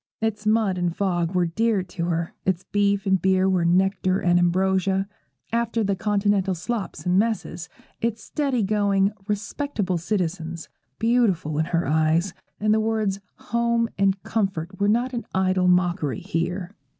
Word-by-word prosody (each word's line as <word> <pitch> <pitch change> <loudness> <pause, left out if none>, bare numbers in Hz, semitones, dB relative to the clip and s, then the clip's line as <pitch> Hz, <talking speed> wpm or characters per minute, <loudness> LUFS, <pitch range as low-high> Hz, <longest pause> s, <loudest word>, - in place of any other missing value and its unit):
Its 215 -1 -2
mud 215 -4 +2
and 175 -1 -1
fog 175 -3 0
were 180 -1 +3
dear 210 +3 +1
to 175 -1 -4
her; 170 -1 -2
its 185 -2 0
beef 200 0 +1
and 190 -1 +2
beer 190 0 +3
were 185 -2 +2
nectar 185 +2 +2
and 175 0 +3
ambrosia, 190 +2 +1 0.5
after 230 -1 0
the 200 -1 0
continental 200 -1 +1
slops 205 +4 -4
and 180 +1 +3
messes; 205 -6 -2 0.3
its 230 -1 -2
steady 275 -6 -1
going, 200 -1 +2 0.2
respectable 205 - -2
citizens, 170 -3 -3 0.3
beautiful 205 -10 +1
in 160 - +2
her 170 +1 0
eyes, 160 +4 +2 0.3
and 215 0 +2
the 220 - +3
words 215 -3 0 0.2
'home' 235 0 0
and' 195 -1 +1
comfort' 190 -4 -2
were 200 0 +2
not 240 +4 +1
an 240 - -3
idle 185 -1 +2
mockery 175 - +1
here. 180 +3 -3
190 Hz, 150 wpm, -24 LUFS, 175-215 Hz, 0.5 s, were